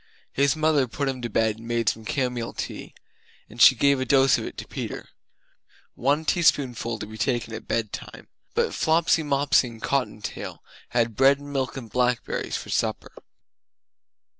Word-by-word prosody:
His 140 +2 +2
mother 155 -4 +2
put 140 +4 -3
him 130 -2 -3
to 120 - -3
bed 110 0 +1
and 115 - -11
made 120 -1 -1
some 110 0 -5
camomile 125 -5 -2
tea; - - -6 0.5
and 115 +2 -7
she 130 - +9
gave 140 +3 +3
a - - 0
dose 135 0 +4
of - - -5
it - - -8
to - - -7
Peter! - - -6 0.8
"One 145 +5 0
teaspoonful 130 -9 +1
to 105 - -6
be 110 +1 -11
taken 120 +2 -1
at - - -7
bedtime." 110 -3 -4 0.3
But - - +1
Flopsy, 165 +1 +2
Mopsy 140 -3 +2
and 115 -2 -10
Cottontail 125 -4 -3 0.3
had 115 -2 0
bread 135 +3 +5
and 145 0 -10
milk 130 -2 -2
and 125 -4 -7
blackberries 125 +1 -1
for - - -8
supper. - - -1
125 Hz, 165 wpm, -25 LUFS, 115-140 Hz, 0.8 s, she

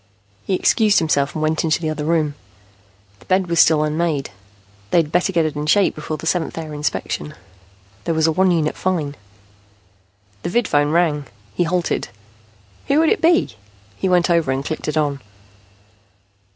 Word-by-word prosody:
He 190 - 0
excused 210 +2 +3
himself 145 -4 +1
and 155 - -2
went 155 0 0
into 160 -2 +1
the 160 -2 -2
other 150 -1 -4
room. 155 -2 +1 0.9
The - - -20
bed 185 0 +2
was 170 -2 0
still 155 -1 +5
unmade. 155 -5 -1 0.6
They - - +2
had 160 -3 +2
better 175 +3 +1
get 170 -3 +2
it 155 -1 -3
in 150 +1 -3
shape 200 +4 +3
before 155 0 -5
the - - -9
seventh 165 0 -1
hour 155 -2 -6
inspection. 145 - -3 0.7
There 165 - 0
was 160 -1 +2
a 165 - +3
one 185 +4 +2
unit 160 -3 +1
fine 160 -6 -2 1.3
The - - -3
vidphone 150 -9 +1
rang. 155 -4 +1 0.3
He 175 - 0
halted. 175 0 -1 0.8
Who 280 - +2
would 320 0 +4
it 440 - +1
be? 335 - +3 0.4
He 190 - -1
went 180 -1 +3
over 165 -5 +2
and 135 +1 -2
clicked 155 - -4
it 150 - -1
on. 145 -2 0
160 Hz, 175 wpm, -20 LUFS, 150-175 Hz, 1.3 s, still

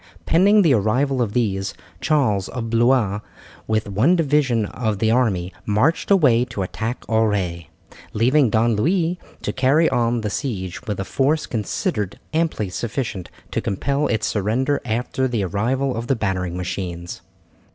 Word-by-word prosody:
Pending 200 +5 +5
the 160 -6 +4
arrival 125 +5 +1
of 110 -4 -1
these, 95 -5 -1 0.2
Charles 110 -11 +1
of 115 -3 -5
Blois, 115 -3 +3 0.5
with 110 -1 0
one 110 - +3
division 140 -8 +2
of 110 -1 -2
the 110 +2 +1
army, 95 -7 +1
marched 110 +11 +1
away 140 - +5
to 115 -5 -4
attack 115 +6 -4
Auray, 100 -7 0 0.4
leaving 125 +4 +3
Don 115 +1 +2
Louis 170 - +1 0.2
to - - -2
carry 140 +5 +3
on 120 -2 +1
the 105 -2 -3
siege 95 - -4
with 105 -2 -3
a 95 - -2
force 145 +7 +1
considered 105 -2 -2 0.2
amply 160 - 0
sufficient 110 -4 -4 0.2
to - - -1
compel 140 +9 -1
its 110 -1 0
surrender 120 +8 0
after 125 +3 -1
the 115 -5 -1
arrival 125 +8 -1
of 115 +1 -4
the 135 - +2
battering 90 -5 -2
machines. 90 -1 -5
115 Hz, 150 wpm, -21 LUFS, 100-135 Hz, 0.5 s, Pending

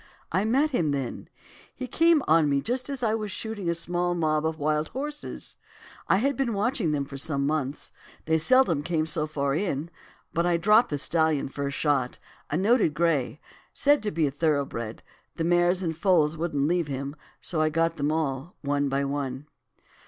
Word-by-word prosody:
'I 190 +5 +1
met 270 +7 +2
him 170 - +1
then; 135 -4 -3 0.5
he - - -5
came 330 +2 +3
on 160 -2 +4
me 140 -1 +2
just 250 - -2
as 275 -3 -4
I 220 -2 +2
was 215 -2 -2
shooting 205 -2 -4
a 170 - +1
small 175 +1 -1
mob 155 -2 +1
of 160 0 -3
wild 150 0 0
horses. 295 +3 -6 0.5
I - - +4
had 275 +6 +1
been 235 -4 -1
watching 225 -1 0
for - - +1
them 145 -2 -1
for 140 0 -2
months. 140 0 -2 0.3
They 160 0 +2
seldom 180 - +4
came 155 0 0
so 155 -1 -1
far 140 -2 -1
in; 165 -2 -2 0.4
but 170 - +1
I 175 -1 +2
dropped 210 +7 +4
the 145 - -1
stallion 160 -1 +1
first 140 0 -4
shot, 140 -5 0 0.3
a 150 - 0
noted 200 -4 +3
grey, 155 -3 +1 0.3
said 290 +1 +4
to 210 - -1
be 160 -3 +1
thoroughbred; 140 -7 -1 0.3
the 165 - -2
mares 175 +2 +2
and 165 -2 -2
foals 165 -3 +3
wouldn't 155 -4 -1
leave 175 -1 +1
him, 140 +1 -4 0.2
so 160 -3 -2
I 155 - +3
got 165 +1 0
them 145 +1 0
all, 155 0 -2
one 145 0 0
by 140 +1 0
one. 140 -1 -3
160 Hz, 185 wpm, -26 LUFS, 145-195 Hz, 0.5 s, on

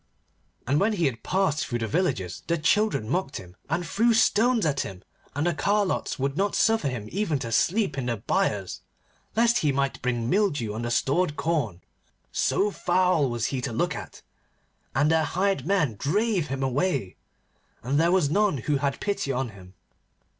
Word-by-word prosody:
And 140 +4 +2
when 215 +2 +2
he 170 -9 +1
passed 185 0 0
through 120 - -2
the 115 -1 -2
villages 110 - -1
the 170 - +1
children 170 - +1
mocked 170 +2 -1
him, 90 -1 -11
and 170 +3 -1
threw 225 +7 +2
stones 225 0 +3
at 140 -3 0
him, 95 -7 -5 0.3
and 145 +3 0
the 175 - +2
carlots 200 -4 0
would 135 0 -1
not 200 +4 0
suffer 225 -8 +2
him 120 -6 -4
even 195 -6 0
to 120 -4 -5
sleep 175 - +1
in 125 - -3
the 120 -2 -1
byres 105 - -1 0.5
lest 235 +1 +4
he 150 - +2
might 140 0 -1
bring 120 -2 -1
mildew 145 - +1
on 110 - -4
the 120 - -2
stored 145 +6 +1
corn, 135 - -1 0.5
so 205 +1 +1
foul 180 -6 +2
was 120 -1 -2
he 130 - -1
to 125 -1 -3
look 115 - -1
at, - - -9 0.7
and 145 +4 +3
their 160 -1 +3
hired 190 +4 0
men 160 - +1
drave 195 +2 +1
him 135 -1 -3
away, 135 - -1 0.7
and 135 +5 +1
there 170 +2 +3
was 185 -5 +3
none 200 +1 +2
who 145 +3 0
had 140 0 -1
pity 200 -9 -1
on 130 -1 -2
him. 95 -2 -14
150 Hz, 180 wpm, -26 LUFS, 125-190 Hz, 0.7 s, lest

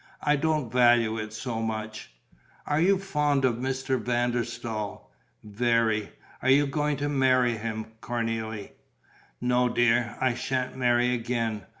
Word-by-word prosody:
I 150 0 +3
don't 150 -4 0
value 120 -3 +4
it 110 0 -5
so 115 +1 -4
much." 110 - -4 0.5
"Are 150 +1 +1
you 195 +3 +4
fond 150 -7 +1
of 120 -3 +1
Mr. 130 0 -1
van 120 +1 0
der 120 0 0
Staal?" 115 -3 -6 0.3
"Very." 110 0 +1 0.3
"Are 130 - +1
you 140 +2 +5
going 150 +1 -1
to 145 - -2
marry 130 -4 +3
him, 110 0 -4 0.2
Cornélie?" 115 -3 -3 0.7
"No, 125 0 +2
dear. 120 -1 +2
I 130 -2 +2
sha'n't 130 +1 -2
marry 125 -1 +2
again. 115 -3 -2
120 Hz, 140 wpm, -27 LUFS, 115-130 Hz, 0.7 s, you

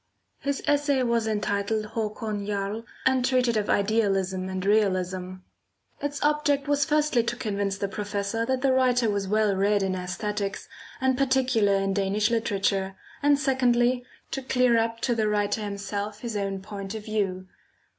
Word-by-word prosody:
His 280 0 -2
essay 285 -2 +2
was 235 -2 +1
entitled 215 0 -1
"Hakon 215 -2 -3
Jarl," 205 +2 -3 0.2
and 260 -1 +3
treated 250 -2 +2
of 210 -1 0
Idealism 195 -3 +1
and 190 0 -3
Realism. 185 -3 +1 0.7
Its 285 0 -3
object 295 -1 +2
was 285 -1 +2
firstly 300 -4 +2
to 235 +1 -2
convince 200 -4 -2
the 200 - -1
professor 205 +2 -2
that 260 0 0
the 270 -1 +4
writer 250 -3 +3
was 200 -1 -2
well 210 0 +2
read 200 +1 +2
in 190 -1 0
æsthetics 200 +3 -3 0.3
and 260 0 +1
particularly 250 -7 +2
in 195 0 0
Danish 200 +3 +1
literature, 195 -4 0 0.3
and 290 0 +4
secondly, 250 -2 +2 0.3
to 270 - -2
clear 250 -2 +2
up 230 0 -1
to 245 - +1
the 220 -2 +1
writer 210 0 0
himself 205 0 -4
his 235 -3 -4
own 195 -1 -2
point 200 0 -6
of 215 -1 -7
view. 195 -4 -1
215 Hz, 155 wpm, -26 LUFS, 200-250 Hz, 0.7 s, the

